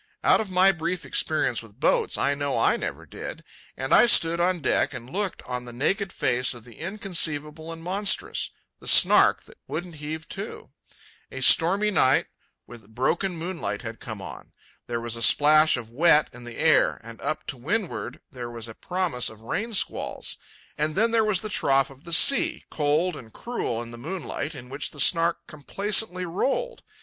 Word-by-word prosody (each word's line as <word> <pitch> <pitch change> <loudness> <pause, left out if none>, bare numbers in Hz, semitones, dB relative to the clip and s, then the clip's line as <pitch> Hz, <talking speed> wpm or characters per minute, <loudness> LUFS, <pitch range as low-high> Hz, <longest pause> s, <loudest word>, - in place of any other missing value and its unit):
Out - - +4
of 215 - -6
my 185 +1 +5
brief 175 +1 -4
experience 140 -7 0
with 115 0 -17
boats - - +2
I 140 - +1
know 140 -1 -2
I - - +3
never - - -5
did. - - -8 0.3
And 135 0 -1
I - - +7
stood 170 -6 +4
on 180 +1 +1
deck - - +1
and 120 - -8
looked 195 +7 -4
on 125 -1 -5
the 120 - -9
naked 190 - -1
face 125 +1 +1
of 120 - -12
the 120 -3 -15
inconceivable 165 -5 -1
and 165 0 -9
monstrous—the 195 +3 -2
Snark - - +5
that - - -18
wouldn't 175 -3 -6
heave 155 +2 -6
to. - - -7 0.6
A 130 - -6
stormy 190 +10 +4
night 130 -9 +3 0.4
with 110 -2 -15
broken 175 +8 0
moonlight 160 - -4
had 115 -1 -7
come 110 -4 -7
on. - - -10 0.3
There 120 -1 -2
was 115 -1 -3
a 115 - -6
splash 155 +5 +5
of 115 -2 -8
wet 150 +3 +4
in 120 0 -11
the 120 -1 -9
air, 160 -1 +3
and 115 0 -11
up 155 - -3
to 145 -4 -5
windward 185 - -3
there 125 -3 -7
was 115 -1 -7
a 115 - -9
promise 175 -5 -2
of 110 0 -15
rain 205 - -3
squalls; 210 - -1 0.4
and 155 +1 0
then 225 +4 +2
there 225 -1 +3
was 210 -4 +1
the 215 - -5
trough 135 -8 +1
of 135 +1 -17
the 170 - -9
sea, 315 - +5
cold 155 +4 0
and 115 -5 -11
cruel 120 - -4
in 115 - -10
the 120 - -10
moonlight, 155 0 -5
in 125 -2 -10
which 140 +3 -4
the 145 - -13
Snark 170 +3 +2
complacently 185 +5 0
rolled. 275 - -2
155 Hz, 185 wpm, -25 LUFS, 125-185 Hz, 0.6 s, I